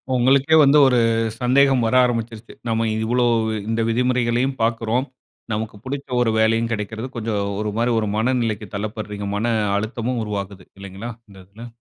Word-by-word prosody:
உங்களுக்கே 135 +5 +3
வந்து 140 +1 +5
ஒரு 125 - +3 0.4
சந்தேகம் 135 +1 +4
வர 115 - +1
ஆரம்பிருச்சு. 115 -2 -3
நம்ம 115 0 0 0.2
இவ்வளோ 120 +2 +1 0.5
இந்த 115 0 0
விதிமுறைகளையும் 125 +2 +1
பார்க்குறோம். 115 +2 0 0.5
நமக்கு 110 0 -4
புடிச்ச 140 +2 -5
1 115 -2 +2
வேலையும் 115 +1 +2
கிடைக்கிறது. 110 +2 -4
கொஞ்சம் 110 -3 -2 0.2
ஒரு 105 -1 -2
மாரி 120 +1 +1
ஒரு 105 -2 -2
மனநிலைக்கு 115 -2 -1
தள்ளப்படுறீங்க. 105 -1 -5
மன 115 +3 0 0.2
அழுத்தமும் 115 +2 -2
உருவாகுது. 100 -3 -5
இல்லைங்களா? 100 +4 -8 0.2
இந்த 100 - -15
இதுல. 110 +5 -11
115 Hz, 140 wpm, -21 LUFS, 110-125 Hz, 0.5 s, வந்து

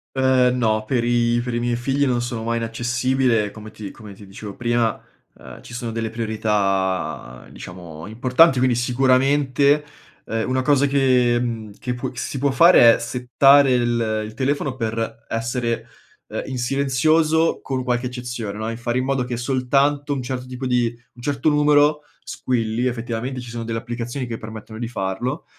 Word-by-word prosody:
Uhm, 130 -1 +3
no, 110 -3 +1
per 120 0 0
i 120 0 +2
per 125 -1 -4
i 120 - 0
miei 120 0 0
figli 135 +4 0
non 120 -2 +1
sono 120 -2 -4
mai 115 0 -1
inaccessibile, 120 -1 0
come 110 0 -10
ti 105 -2 -8
come 105 -3 -12
ti 100 +1 -14
dicevo 100 +1 -9
prima, 120 -1 0 0.4
uhm, - - -12
ci - - -12
sono 120 -2 -4
delle 115 0 -3
priorità, 95 - -1
diciamo, 85 -2 -10
importanti, 130 +7 +4
quindi 125 -1 +2
sicuramente, 135 +3 +2 0.4
uhm, 115 +2 -2
una 130 0 +1
cosa 145 +1 +3
che 130 -3 +3
mhmm, 115 -4 -4
che 125 -1 -3
può 125 +1 -4
che 125 - -15
si 135 - -4
può 140 +1 +2
fare 130 -5 +7
è - - -5
settare 130 +3 +4
il 115 -3 0
il 110 - -9
telefono 135 +2 -1
per 115 -1 -4
essere, 115 0 -2 0.4
uhm, - - -3
in 130 - -4
silenzioso 150 +5 +2
con 130 -1 -3
qualche 125 0 -1
eccezione, 120 -4 -5
no, 110 +1 -3
e 115 - -5
fare 120 +1 -2
in 130 - 0
modo 135 -2 0
che 120 -1 -4
soltanto 140 +3 +1
un 135 -3 -3
certo 125 0 -5
tipo 130 +1 -6
di 125 -2 +2 0.3
un 120 - -15
certo 140 +3 0
numero, 150 0 +4 0.2
squilli. 115 -1 -2
Effettivamente, 120 +2 -3
ci 120 -1 -8
sono 115 0 -5
delle 115 0 -3
applicazioni 120 +2 -5
che 115 -2 -6
permettono 110 0 -9
di 120 - -3
farlo 120 - -3
120 Hz, 175 wpm, -21 LUFS, 115-130 Hz, 0.4 s, fare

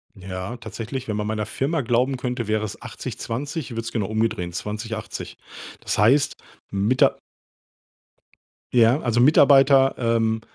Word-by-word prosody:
Ja, 95 +4 -6
tatsächlich. 115 +3 -6
Wenn 105 - -2
man 105 0 -2
meiner 110 0 -2
Firma 140 +8 -1
glauben 125 +3 +1
könnte, 125 -3 -3
wäre 110 0 0
es 100 - -8
80 - - -7
20, 140 +6 -4
ich - - -10
würde 115 0 -3
es 115 - -6
genau 105 -4 -2
umdrehen, 110 -5 -1
20 105 +4 -4
80. 110 - -7 0.4
Das - - -2
heißt 140 +7 +3 0.4
Mita 105 +6 +2 1.5
Ja, 120 +3 +5
also 120 -1 0
Mitarbeiter, 135 0 +6
ähm, 115 -2 +1
115 Hz, 150 wpm, -23 LUFS, 110-130 Hz, 1.5 s, Mitarbeiter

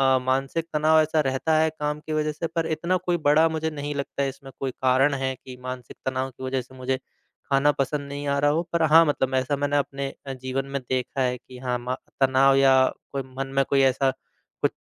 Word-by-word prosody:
अ, - - +2
मानसिक 135 +5 0
तनाव 155 +1 +4
ऐसा 155 0 +1
रहता 135 +4 +1
है, 160 - +3
काम 150 -1 -3
की 155 +1 -6
वजह 155 0 0
से, 165 +3 -4
पर 165 0 -2
इतना 170 +4 0
कोई 175 -1 -1
बड़ा 150 +3 +5
मुझे 160 0 -2
नहीं 145 0 -4
लगता 140 0 -3
है, 135 - 0
इसमें 135 0 -11
कोई 135 -1 -2
कारण 130 +3 +2
है 135 -1 -1
कि 130 0 -11
मानसिक 130 -2 -7
तनाव 130 0 -1
की 130 - -12
वजह 130 0 -1
से 130 +2 -16
मुझे 130 0 -1 0.5
खाना 140 +2 +4
पसंद 140 +1 -2
नहीं 145 0 -5
आ 140 0 +1
रहा 145 0 +3
हो। 160 +3 +1
पर 170 -1 +2
हाँ, 160 +1 +7
मतलब 135 -3 0
ऐसा 130 +2 +1
मैंने 145 +1 +1
अपने 140 -1 -2 0.2
अ, 135 - -3
जीवन 130 +1 -3
में 135 0 -4
देखा 130 +1 -1
है 125 0 +1
कि 125 +1 -14
हाँ, 125 -1 -1
मा 125 +1 -3 0.3
तनाव 135 +1 +5
या 135 -1 +5 0.3
कोई 140 -1 -3
मन 135 - -2
में 135 - +5
कोई 140 -1 +4
ऐसा 135 0 +3 0.5
कुछ - - +2
135 Hz, 230 wpm, -25 LUFS, 130-150 Hz, 0.5 s, हाँ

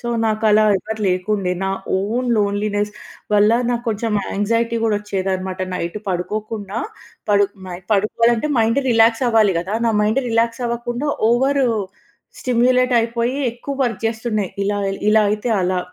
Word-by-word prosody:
So, 240 - -5 0.2
నాకు 215 0 -1
అలా 215 +1 +5
ఎవరు 220 +3 -6
లేకుండే. 185 +1 0
నా 195 - 0 0.3
ఓన్ 235 +6 -1
లోన్లీనెస్ 205 0 0 0.4
వల్ల, 210 +1 +5 0.2
నాకు 240 0 -2
కొంచెం 220 0 -2 0.2
యాంగ్జైటీ 230 +3 0
కూడా 220 -2 +2
వచ్చేదనమాట. 190 -2 -3 0.2
నైట్ 175 +3 -3
పడుకోకుండా 205 +3 -3 0.5
పడు 205 0 +5 0.2
నై 175 0 -6
పడుకోవాలంటే, 230 +6 +2
మైండ్ 230 +5 +2
రిలాక్స్ 225 +1 +4
అవ్వాలి 220 -4 +4
గదా! 190 +5 -4
నా 225 - +2
మైండ్ 220 +6 +1
రిలాక్స్ 230 +2 0
అవ్వకుండా, 240 +4 -3 0.2
ఓవర్ 270 +3 +2 0.8
స్టిమ్యులేట్ 250 +1 +2
అయిపోయి, 235 +2 -1 0.2
ఎక్కువ 260 +4 -6
వర్క్ 230 -6 -1
చేస్తుండే. 220 -2 -1 0.2
ఇలా 205 +1 0 0.3
ఇలా 215 0 +5
అయితే, 210 +3 -2
అలా 180 0 0
220 Hz, 140 wpm, -19 LUFS, 205-235 Hz, 0.8 s, అలా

